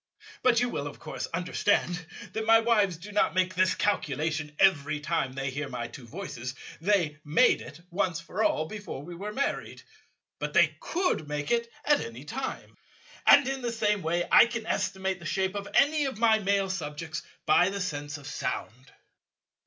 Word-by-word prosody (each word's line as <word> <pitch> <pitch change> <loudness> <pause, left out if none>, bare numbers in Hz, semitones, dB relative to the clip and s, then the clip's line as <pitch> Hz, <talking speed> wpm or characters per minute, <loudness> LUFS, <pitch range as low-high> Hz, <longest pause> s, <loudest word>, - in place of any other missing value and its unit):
But 240 -2 +4
you 245 - +1
will 145 -9 -3
of 145 - -8
course - - -5
understand 175 0 0 0.3
that 220 0 -3
my 225 0 +7
wives 210 -6 +2
do 195 +5 -10
not 205 -2 +2
make 185 0 +2
this 185 +1 +2
calculation 150 -4 -1
every 155 -5 +3
time 150 -4 -1
they 135 0 -3
hear 145 +1 -4
my 120 -2 -4
two 120 - -11
voices. 130 -6 -6 0.3
They 170 -6 +1
made 150 +1 +4
it, - - -11
once 180 -2 0
for 180 +6 -3
all, 155 -7 +2
before 205 -5 -7
we 175 +3 -8
were 200 +5 -5
married. 275 +5 -3 0.6
But - - -4
they - - +5
could 345 - -1
make 145 0 -3
it 235 0 +1
at 295 -1 +4
any 115 +3 -7
time. 250 - -5 0.5
And 285 -2 +8
in 270 0 -2
the 240 -1 -2
same 210 -3 +1
way 170 +1 0
I - - +8
can 230 -1 -4
estimate 190 -3 -1
the 170 - -11
shape 190 +3 0
of 200 0 -5
any 295 +1 +4
of 265 -5 -3
my 220 -1 +4
Male 200 -1 +1
subjects 155 -2 -4 0.2
by 175 +4 +5
the 200 0 -4
sense 145 -4 -4
of 145 - -13
sound." 125 +1 -5
185 Hz, 185 wpm, -28 LUFS, 150-215 Hz, 0.6 s, And